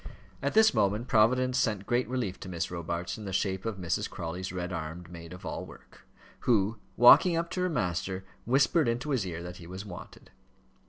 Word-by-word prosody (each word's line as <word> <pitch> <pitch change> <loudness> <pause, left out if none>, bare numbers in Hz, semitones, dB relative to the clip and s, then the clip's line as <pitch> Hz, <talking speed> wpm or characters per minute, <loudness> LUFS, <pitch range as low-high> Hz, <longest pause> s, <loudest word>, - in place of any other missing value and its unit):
At - - -1
this 220 0 +6
moment 105 +1 +1
Providence 125 +4 +3
sent 105 -3 0
great 120 +3 0
relief 120 -8 -2
to 95 - -8
Miss 85 -2 -3
Robarts 85 +2 -4
in 105 - -8
the 95 - -4
shape 95 +1 -1
of 110 -3 -3
Mrs. 90 -3 -1
Crawley's 90 +3 -5
red 90 0 -4
armed 85 +2 -6
maid 85 -1 -10
of 90 - -10
all - - -4
work, - - -15 0.3
who, 110 -1 +2 0.2
walking 165 +8 +8
up 170 0 -2
to 180 - -2
her 180 - +1
master, 95 - -2 0.2
whispered 140 +5 +3
into 120 +5 -1
his 115 -8 0
ear 85 -1 -5
that 90 0 -7
he 85 - -11
was 95 +3 -7
wanted. 95 -4 -11
95 Hz, 200 wpm, -29 LUFS, 90-120 Hz, 0.3 s, walking